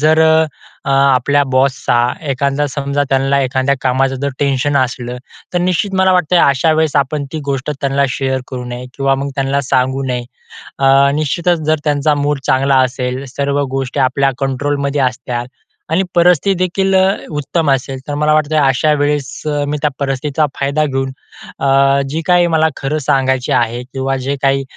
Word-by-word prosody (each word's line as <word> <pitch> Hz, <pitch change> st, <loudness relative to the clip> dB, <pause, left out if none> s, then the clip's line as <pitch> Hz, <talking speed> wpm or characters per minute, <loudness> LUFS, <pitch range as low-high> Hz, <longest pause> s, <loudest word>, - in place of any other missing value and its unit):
जर 155 Hz, +1 st, +4 dB, 0.6 s
अ, 140 Hz, -, -2 dB
आपल्या 135 Hz, +1 st, +3 dB
बॉसचा 130 Hz, -2 st, +1 dB, 0.3 s
एखादा 140 Hz, +2 st, 0 dB
समजा, 140 Hz, 0 st, -1 dB
त्याला 135 Hz, +1 st, +2 dB
एखाद्या 130 Hz, +2 st, +1 dB
कामाचं 135 Hz, +1 st, +1 dB
जर 140 Hz, -, 0 dB
टेन्शन 140 Hz, 0 st, 0 dB
असलं 125 Hz, -2 st, -1 dB, 0.4 s
तर -, -, +3 dB
निश्चित 185 Hz, +2 st, 0 dB
मला 190 Hz, 0 st, +3 dB
वाटतंय 180 Hz, -1 st, +2 dB
अशा 145 Hz, +2 st, +3 dB
वेळेस 155 Hz, -2 st, +1 dB
आपण 140 Hz, +1 st, 0 dB
ती 160 Hz, -, -3 dB
गोष्ट 140 Hz, +1 st, -2 dB
त्यांना 140 Hz, 0 st, +1 dB
शेअर 130 Hz, +1 st, -2 dB
करू 125 Hz, -1 st, -6 dB
नये 125 Hz, +1 st, -6 dB
किंवा 135 Hz, -1 st, +1 dB
मग 140 Hz, +1 st, -3 dB
त्यांना 135 Hz, 0 st, 0 dB
सांगू 130 Hz, +1 st, 0 dB
नये. 125 Hz, -1 st, -2 dB, 0.6 s
अ, 135 Hz, +1 st, +5 dB
निश्चितच 165 Hz, +3 st, 0 dB
जर 155 Hz, -1 st, +2 dB
त्यांचा 150 Hz, 0 st, +1 dB
मूड 145 Hz, 0 st, -1 dB
चांगला 135 Hz, +1 st, +3 dB
असेल, 125 Hz, +1 st, -4 dB
सर्व 140 Hz, 0 st, 0 dB
गोष्टी 135 Hz, +1 st, -3 dB
आपल्या 135 Hz, +1 st, +2 dB
कंट्रोलमध्ये 140 Hz, +1 st, -1 dB
असत्याल 125 Hz, -1 st, -2 dB, 0.4 s
आणि 185 Hz, +4 st, +2 dB
परिस्थिती 180 Hz, +2 st, +4 dB
देखील 190 Hz, +1 st, +1 dB
अ, 190 Hz, 0 st, +4 dB, 0.2 s
उत्तम 150 Hz, +2 st, -1 dB
असेल. 135 Hz, 0 st, -1 dB
तर 145 Hz, -, -3 dB
मला 150 Hz, +1 st, +2 dB
वाटतं 155 Hz, 0 st, +1 dB
अशा 135 Hz, +3 st, +2 dB
वेळेस 145 Hz, -1 st, -1 dB
अ, 145 Hz, -1 st, 0 dB
मी 150 Hz, +1 st, -2 dB
त्या 150 Hz, -, +2 dB
परिस्थितीचा 140 Hz, +2 st, -1 dB
फायदा 140 Hz, +2 st, +1 dB
घेऊन 135 Hz, -1 st, -2 dB, 0.5 s
अ, 135 Hz, 0 st, +3 dB
जे 160 Hz, +3 st, -2 dB
काही 175 Hz, -1 st, +4 dB
मला 160 Hz, 0 st, +3 dB
खरं 145 Hz, +3 st, -2 dB
सांगायचे 130 Hz, -2 st, +1 dB
आहे 120 Hz, 0 st, 0 dB
किंवा 135 Hz, +1 st, -3 dB
जे 140 Hz, -, 0 dB
काही 135 Hz, 0 st, +2 dB
140 Hz, 165 wpm, -15 LUFS, 135-150 Hz, 0.6 s, अ